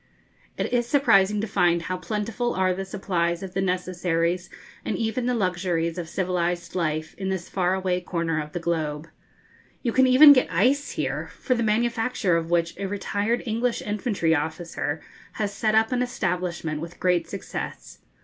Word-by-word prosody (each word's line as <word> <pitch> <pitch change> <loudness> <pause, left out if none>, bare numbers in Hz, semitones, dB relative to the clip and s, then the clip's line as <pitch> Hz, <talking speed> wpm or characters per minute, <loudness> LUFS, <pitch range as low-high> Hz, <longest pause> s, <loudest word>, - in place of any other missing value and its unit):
It - - -2
is 240 -1 +2
surprising 210 -7 +4
to 220 - -2
find 175 -4 +2
how 185 - -2
plentiful 220 +5 -2
are 185 -1 +2
the 195 +1 -4
supplies 175 -3 -1
of 185 -1 -7
the 195 - 0
necessaries 180 -1 -1 0.3
and - - -2
even 230 +2 -1
the 250 - +1
luxuries 180 -4 -1
of 165 -2 -5
civilised 175 -2 -1
life 155 -3 -1
in 190 -1 -2
this 190 -2 -3
far 185 -1 +1
away 185 -1 -1
corner 165 -3 -1
of 150 0 -9
the 175 - -2
globe. 160 -2 -2 0.7
You 240 - +1
can 260 +2 +4
even 285 +3 +9
get 255 - +2
ice 255 +12 +2
here, - - -2
for 255 - 0
the 235 - -1
manufacture 225 -3 +1
of 165 0 -1
which 170 -1 +1
a 200 - -2
retired 205 +3 -1
English 230 +1 0
infantry 205 -5 0
officer 160 -1 -2 0.3
has 205 -2 -2
set 215 0 +1
up 220 +2 +3
an 250 -1 +1
establishment 180 -9 -2
with 170 +1 -8
great 180 -2 +1
success. 200 - -6
185 Hz, 170 wpm, -25 LUFS, 170-220 Hz, 0.7 s, even